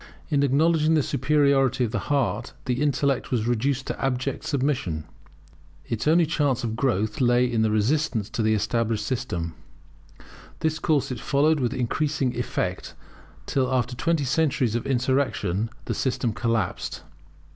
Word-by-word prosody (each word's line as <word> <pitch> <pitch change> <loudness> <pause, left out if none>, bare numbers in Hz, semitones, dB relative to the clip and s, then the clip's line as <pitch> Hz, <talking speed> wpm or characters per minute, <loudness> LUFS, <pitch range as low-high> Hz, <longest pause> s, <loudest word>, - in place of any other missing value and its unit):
In 145 -3 +2
acknowledging 155 +3 +3
the 150 - +3
superiority 135 -2 +2
of 115 - -1
the 115 - -1
heart 120 -5 0
the 125 0 -1
intellect 140 -4 +1
was 115 -4 0
reduced 125 +3 0
to - - -4
abject 135 0 -1
submission. 130 - -1 0.8
Its 115 +4 -3
only 165 +2 +5
chance 145 -6 0
of 110 -2 -2
growth 110 -3 0
lay 120 0 +4
in 120 -3 0
resistance 115 0 +1
to 120 - -2
the 110 0 +3
established 110 +1 0
system. 90 -11 -3 1.1
This 160 0 0
course 150 -6 +1
it 125 - -4
followed 150 +5 +2
with 125 -1 -1
increasing 130 +1 -1
effect, 95 -6 -3 0.5
till 130 +4 0
after 125 -1 0
twenty 165 +4 0
centuries 135 -4 +1
of 120 +3 -2
insurrection, 125 -6 0 0.2
the - - -2
system 125 -3 -1
collapsed. 115 0 -2
130 Hz, 145 wpm, -25 LUFS, 115-140 Hz, 1.1 s, only